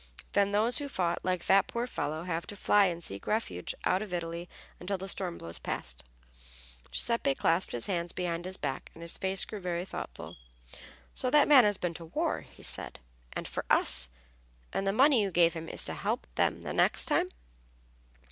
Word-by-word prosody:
Then 200 Hz, 0 st, +3 dB
those 220 Hz, +6 st, +4 dB
who 290 Hz, -, -4 dB
fought, 175 Hz, -8 st, -1 dB
like 185 Hz, -2 st, -2 dB
that 195 Hz, 0 st, +4 dB
poor 235 Hz, +1 st, -2 dB
fellow, 155 Hz, -9 st, -3 dB
have 170 Hz, -1 st, -3 dB
to 205 Hz, -, -7 dB
fly 205 Hz, +1 st, +4 dB
and 170 Hz, -2 st, -2 dB
seek 100 Hz, -7 st, -3 dB
refuge 150 Hz, -, -2 dB
out 185 Hz, -, +2 dB
of 200 Hz, -4 st, -4 dB
Italy 170 Hz, 0 st, -5 dB, 0.3 s
until 190 Hz, +2 st, -3 dB
the 190 Hz, +1 st, -7 dB
storm 185 Hz, -3 st, -2 dB
blows 85 Hz, 0 st, -8 dB
past." 60 Hz, -1 st, -4 dB, 0.9 s
Giuseppe 235 Hz, -, +1 dB
clasped 165 Hz, +6 st, +2 dB
his 120 Hz, -, 0 dB
hands 175 Hz, -3 st, -1 dB
behind 175 Hz, -1 st, -3 dB
his 185 Hz, +1 st, -5 dB
back, 135 Hz, -, -4 dB
and 165 Hz, -, -10 dB
his 170 Hz, -, -3 dB
face 190 Hz, 0 st, +3 dB
grew 210 Hz, -, -7 dB
very 175 Hz, -1 st, -3 dB
thoughtful. -, -, -8 dB, 0.8 s
"So 255 Hz, -, 0 dB
that 295 Hz, +2 st, +5 dB
man 270 Hz, -6 st, +8 dB
has 205 Hz, -2 st, +2 dB
been 175 Hz, -3 st, -2 dB
to 165 Hz, 0 st, -8 dB
war," 160 Hz, -, -1 dB
he -, -, -17 dB
said, -, -, 0 dB, 0.3 s
"and -, -, -4 dB
for -, -, -4 dB
us, 65 Hz, -1 st, +6 dB, 0.6 s
and 195 Hz, -, -1 dB
the -, -, +3 dB
money 265 Hz, +3 st, +5 dB
you 200 Hz, -, 0 dB
gave 170 Hz, -2 st, +4 dB
him 165 Hz, -1 st, -6 dB
is -, -, +1 dB
going -, -, -1 dB
to -, -, -9 dB
help -, -, -1 dB
them -, -, 0 dB
the -, -, -4 dB
next -, -, +4 dB
time?" -, -, +1 dB
180 Hz, 200 wpm, -30 LUFS, 170-205 Hz, 0.9 s, man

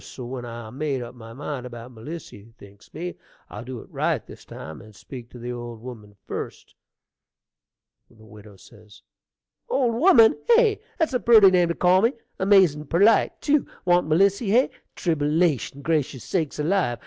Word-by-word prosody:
So 125 Hz, -, -9 dB
when 125 Hz, 0 st, -6 dB
I 115 Hz, -2 st, -8 dB
made 135 Hz, -1 st, -3 dB
up 120 Hz, -, -9 dB
my 115 Hz, -2 st, -12 dB
mind 135 Hz, 0 st, -6 dB
about 120 Hz, 0 st, -10 dB
Melissy, 115 Hz, -3 st, -10 dB
thinks 100 Hz, 0 st, -17 dB
me, 175 Hz, +1 st, -6 dB, 0.3 s
I'll -, -, -7 dB
do 125 Hz, -2 st, -7 dB
it -, -, -15 dB
right -, -, -1 dB
this -, -, -14 dB
time, 80 Hz, +1 st, -9 dB
and 110 Hz, -1 st, -16 dB
speak 120 Hz, +4 st, -10 dB
to -, -, -13 dB
the 120 Hz, +1 st, -6 dB
old 120 Hz, -1 st, -7 dB
woman 110 Hz, -4 st, -11 dB
first -, -, -7 dB, 1.4 s
Widow 105 Hz, -2 st, -16 dB, 1.1 s
Old 250 Hz, -4 st, +1 dB
woman, 235 Hz, -4 st, +5 dB, 0.2 s
hey! 450 Hz, -3 st, +3 dB, 0.2 s
That's 320 Hz, -5 st, 0 dB
a 250 Hz, -, +1 dB
purty 220 Hz, -5 st, +7 dB
name 180 Hz, -2 st, +3 dB
to 170 Hz, -, -1 dB
call 185 Hz, +1 st, +4 dB
me! 230 Hz, +5 st, +2 dB, 0.3 s
amazin' 185 Hz, -7 st, +4 dB
perlite, 200 Hz, +8 st, +3 dB
tew! 295 Hz, -1 st, +1 dB, 0.2 s
Want 175 Hz, -2 st, +3 dB
Melissy, 195 Hz, +6 st, +2 dB
hey! 245 Hz, +6 st, +3 dB, 0.2 s
Tribble 160 Hz, -1 st, +1 dB
ation! 140 Hz, -3 st, -1 dB
gracious 150 Hz, -6 st, -1 dB
sakes 160 Hz, -6 st, -2 dB
alive! 150 Hz, -5 st, 0 dB
150 Hz, 160 wpm, -24 LUFS, 120-190 Hz, 1.4 s, purty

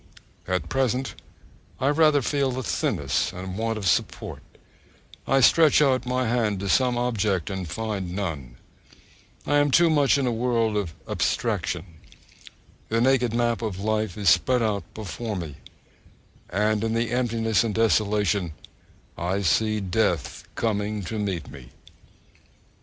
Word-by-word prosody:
At 90 Hz, 0 st, -1 dB
present 130 Hz, 0 st, 0 dB, 0.7 s
I 135 Hz, +1 st, +2 dB
rather 150 Hz, -2 st, +4 dB
feel 135 Hz, -2 st, 0 dB
a 130 Hz, -, -3 dB
thinness 90 Hz, -, -1 dB
and 95 Hz, +1 st, -7 dB
want 115 Hz, +1 st, -1 dB
of 105 Hz, -, -5 dB
support, 85 Hz, -, -1 dB, 0.9 s
I 135 Hz, 0 st, +3 dB
stretch 155 Hz, +4 st, +6 dB
out 130 Hz, -4 st, +2 dB
my 125 Hz, 0 st, 0 dB
hand 110 Hz, -4 st, 0 dB
to 100 Hz, -, -3 dB
some 125 Hz, +3 st, +3 dB
object 110 Hz, -6 st, 0 dB
and 95 Hz, -3 st, -4 dB
find 100 Hz, -3 st, -4 dB
none, 75 Hz, -11 st, -4 dB, 0.9 s
I 145 Hz, -, +2 dB
am 145 Hz, 0 st, +3 dB
too 170 Hz, +4 st, +5 dB
much 145 Hz, -3 st, +4 dB
in 140 Hz, -, 0 dB
a 125 Hz, -, +1 dB
world 115 Hz, -2 st, 0 dB
of 95 Hz, -7 st, -2 dB
abstraction; 90 Hz, -1 st, -1 dB, 1.0 s
the 115 Hz, -, +1 dB
naked 125 Hz, -1 st, +3 dB
map 120 Hz, 0 st, 0 dB
of 105 Hz, -5 st, -3 dB
life 110 Hz, -1 st, -1 dB
is 100 Hz, -4 st, +3 dB
spread 125 Hz, +7 st, +3 dB
out 105 Hz, -3 st, -2 dB
before 110 Hz, +2 st, -5 dB
me, 80 Hz, -6 st, -6 dB, 0.9 s
and 105 Hz, +3 st, +1 dB
in 115 Hz, 0 st, 0 dB
the 115 Hz, 0 st, 0 dB
emptiness 115 Hz, -3 st, +1 dB
and 110 Hz, -3 st, -2 dB
desolation 105 Hz, -5 st, +1 dB, 0.7 s
I 95 Hz, +4 st, -1 dB
see 110 Hz, +6 st, +2 dB
Death 90 Hz, -, -1 dB
coming 105 Hz, -2 st, -1 dB
to 105 Hz, +5 st, -4 dB
meet 95 Hz, -7 st, -3 dB
me. 65 Hz, -4 st, -12 dB
110 Hz, 140 wpm, -25 LUFS, 95-125 Hz, 1.0 s, stretch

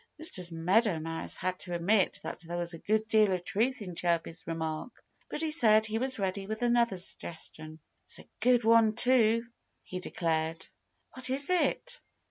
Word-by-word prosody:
Mr. 185 Hz, -, -2 dB
Meadow 180 Hz, +4 st, +2 dB
Mouse 165 Hz, +1 st, -4 dB
had 185 Hz, 0 st, -2 dB
to 175 Hz, -1 st, -3 dB
admit 190 Hz, +4 st, +2 dB
that -, -, -5 dB
there 175 Hz, 0 st, -5 dB
was 175 Hz, 0 st, -2 dB
a 165 Hz, -, -8 dB
good 220 Hz, +3 st, 0 dB
deal 215 Hz, -3 st, +4 dB
of 180 Hz, -1 st, -1 dB
truth 235 Hz, +5 st, 0 dB
in 180 Hz, -3 st, -7 dB
Chirpy's 170 Hz, -1 st, -2 dB
remark. 160 Hz, +6 st, -3 dB, 0.4 s
But 310 Hz, -, -4 dB
he 315 Hz, -, 0 dB
said 220 Hz, -8 st, +4 dB
he 220 Hz, +1 st, -1 dB
was 260 Hz, +1 st, +1 dB
ready 195 Hz, -1 st, -2 dB
with 220 Hz, +2 st, -4 dB
another 235 Hz, -4 st, +2 dB
suggestion. 160 Hz, -3 st, -7 dB, 0.3 s
"It's -, -, -6 dB
a -, -, -13 dB
good 245 Hz, +1 st, +4 dB
one, 225 Hz, -1 st, +5 dB
too," 230 Hz, -2 st, +4 dB, 0.4 s
he 185 Hz, -, -6 dB
declared. 165 Hz, -2 st, -2 dB, 0.5 s
"What 255 Hz, 0 st, 0 dB
is 280 Hz, +6 st, +2 dB
it?" 485 Hz, +7 st, 0 dB
205 Hz, 175 wpm, -30 LUFS, 170-235 Hz, 0.5 s, one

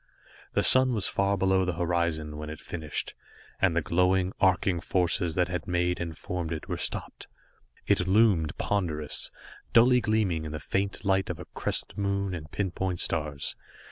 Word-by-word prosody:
The -, -, +2 dB
sun 130 Hz, -1 st, +7 dB
was 105 Hz, -, 0 dB
far 100 Hz, 0 st, +1 dB
below 95 Hz, 0 st, +2 dB
the 90 Hz, -1 st, -1 dB
horizon 85 Hz, -3 st, -1 dB
when 75 Hz, 0 st, -6 dB
it -, -, -4 dB
was -, -, -16 dB
finished, 80 Hz, -3 st, -3 dB, 0.5 s
and 95 Hz, -4 st, +3 dB
the 85 Hz, -, +1 dB
glowing, 90 Hz, +1 st, +2 dB
arcing 95 Hz, -2 st, +3 dB
forces 85 Hz, -1 st, 0 dB
that 90 Hz, -1 st, +2 dB
had 90 Hz, 0 st, -4 dB
made 90 Hz, 0 st, 0 dB
and 85 Hz, -1 st, -5 dB
formed 85 Hz, -2 st, -4 dB
it 80 Hz, -, -5 dB
were -, -, -2 dB
stopped. -, -, -3 dB, 0.6 s
It 90 Hz, -, +2 dB
loomed 95 Hz, -6 st, +3 dB
ponderous, 80 Hz, -7 st, -1 dB, 0.4 s
dully 125 Hz, +2 st, +6 dB
gleaming 105 Hz, -7 st, 0 dB
in 80 Hz, -1 st, -6 dB
the 80 Hz, -, -4 dB
faint 100 Hz, +4 st, -2 dB
light 95 Hz, 0 st, +1 dB
of 85 Hz, -3 st, -4 dB
a -, -, -8 dB
crescent -, -, -2 dB
moon 100 Hz, -1 st, -1 dB
and 80 Hz, -3 st, -7 dB
pinpoint 95 Hz, -1 st, -2 dB
stars. 75 Hz, -3 st, -1 dB
90 Hz, 175 wpm, -28 LUFS, 80-95 Hz, 0.6 s, sun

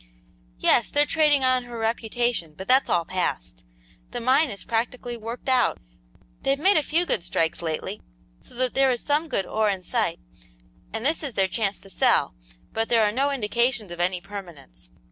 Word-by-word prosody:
"Yes, 220 Hz, -, +3 dB
they're 290 Hz, 0 st, +3 dB
trading 295 Hz, -3 st, +3 dB
on 255 Hz, -1 st, +2 dB
her 240 Hz, -1 st, -8 dB
reputation, 225 Hz, -6 st, -1 dB
but 190 Hz, -, -8 dB
that's 260 Hz, +3 st, +4 dB
all 170 Hz, -1 st, +2 dB
past. 160 Hz, -, -3 dB, 0.5 s
The 245 Hz, -, -5 dB
mine 260 Hz, +5 st, +3 dB
is 200 Hz, -3 st, -6 dB
practically 240 Hz, +1 st, -2 dB
worked 230 Hz, +3 st, -7 dB
out. 255 Hz, -2 st, +3 dB, 0.6 s
They've 275 Hz, +1 st, +1 dB
made 380 Hz, +8 st, +4 dB
a -, -, +4 dB
few 325 Hz, +4 st, +1 dB
good 175 Hz, -, -1 dB
strikes 165 Hz, -2 st, -1 dB
lately, 170 Hz, +5 st, -3 dB, 0.4 s
so -, -, -17 dB
that 255 Hz, 0 st, 0 dB
there 270 Hz, 0 st, +3 dB
is 245 Hz, -2 st, +1 dB
some 300 Hz, +3 st, +1 dB
good 195 Hz, -10 st, -1 dB
ore 215 Hz, -1 st, +1 dB
in 190 Hz, -2 st, -2 dB
sight, -, -, -1 dB, 0.7 s
and 225 Hz, +2 st, -4 dB
this 310 Hz, +3 st, +1 dB
is 280 Hz, -6 st, -5 dB
their 195 Hz, -1 st, +2 dB
chance 200 Hz, +1 st, -1 dB
to 195 Hz, -, -13 dB
sell, -, -, +2 dB, 0.4 s
but 225 Hz, 0 st, -1 dB
there 230 Hz, -2 st, +4 dB
are 210 Hz, -, +3 dB
no 270 Hz, +6 st, +1 dB
indications 235 Hz, -4 st, 0 dB
of 175 Hz, -, -8 dB
any 180 Hz, +1 st, +1 dB
permanence. 175 Hz, -, -10 dB
230 Hz, 185 wpm, -25 LUFS, 190-260 Hz, 0.7 s, that's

